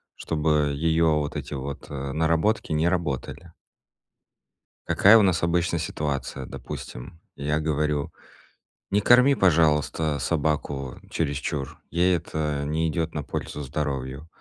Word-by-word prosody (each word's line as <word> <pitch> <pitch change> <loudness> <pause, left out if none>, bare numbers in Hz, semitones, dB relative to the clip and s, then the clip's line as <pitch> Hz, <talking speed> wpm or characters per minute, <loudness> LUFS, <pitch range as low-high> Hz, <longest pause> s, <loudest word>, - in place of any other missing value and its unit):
чтобы 75 -2 +1
её 80 +1 +2
вот 75 -1 -4
эти - - -5
вот, 70 +1 -6
э, 70 -1 -4
наработки 80 +5 +1
не 80 +2 +2
работали. 85 -8 -3 1.4
Какая 105 +3 +6
у 110 - +6
нас 90 -4 +2
обычно 85 0 +1
ситуация? 70 -4 -3
Допустим, 80 +7 -8 0.2
я 75 +2 -1
говорю: 75 -2 -1 0.8
"Не 105 +1 +2
корми, 125 +5 +6
пожалуйста, 80 -4 +2
собаку 70 -3 -1
чересчур. 70 -2 -2
Ей 90 +1 +3
это 75 -3 -3
не 80 +2 0
идёт 80 0 -2
на 75 - -3
пользу 75 - -5
здоровью". 70 0 -4
75 Hz, 120 wpm, -25 LUFS, 70-85 Hz, 1.4 s, Какая